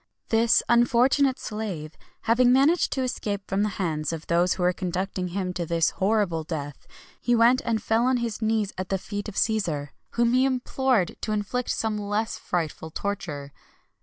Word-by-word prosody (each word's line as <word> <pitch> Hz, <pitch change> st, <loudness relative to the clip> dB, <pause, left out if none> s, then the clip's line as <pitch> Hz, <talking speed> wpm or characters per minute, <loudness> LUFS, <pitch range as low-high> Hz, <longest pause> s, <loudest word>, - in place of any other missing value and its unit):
This 230 Hz, 0 st, +4 dB
unfortunate 250 Hz, +3 st, +3 dB
slave 190 Hz, -8 st, -5 dB, 0.3 s
having 245 Hz, +2 st, +4 dB
managed 280 Hz, +7 st, +4 dB
to 265 Hz, -, -1 dB
escape 205 Hz, -5 st, -3 dB
from 195 Hz, +1 st, 0 dB
the 210 Hz, -, +1 dB
hands 155 Hz, -5 st, -1 dB
of 165 Hz, -1 st, -6 dB
those 175 Hz, +2 st, +2 dB
who 185 Hz, -, -3 dB
were 180 Hz, 0 st, +3 dB
conducting 185 Hz, +1 st, -3 dB
him 185 Hz, 0 st, -3 dB
to 175 Hz, -, -2 dB
this 165 Hz, -1 st, +1 dB
horrible 195 Hz, -5 st, 0 dB
death, 145 Hz, -3 st, -6 dB, 0.3 s
he 240 Hz, -, +2 dB
went 235 Hz, +3 st, +5 dB
and 225 Hz, -2 st, -1 dB
fell 230 Hz, +2 st, +2 dB
on 260 Hz, 0 st, +3 dB
his 235 Hz, -2 st, -3 dB
knees 220 Hz, -2 st, 0 dB
at 185 Hz, -, -4 dB
the 195 Hz, -, +1 dB
feet 205 Hz, +2 st, -5 dB
of 200 Hz, -, -11 dB
Cæsar, 170 Hz, -10 st, 0 dB, 0.2 s
whom 235 Hz, 0 st, +2 dB
he 255 Hz, +1 st, +4 dB
implored 255 Hz, -5 st, +1 dB
to 215 Hz, -, -2 dB
inflict 215 Hz, +4 st, -2 dB
some 220 Hz, -1 st, -1 dB
less 210 Hz, +2 st, -2 dB
frightful 160 Hz, -2 st, -3 dB
torture. 160 Hz, -7 st, -4 dB
205 Hz, 175 wpm, -25 LUFS, 180-235 Hz, 0.3 s, went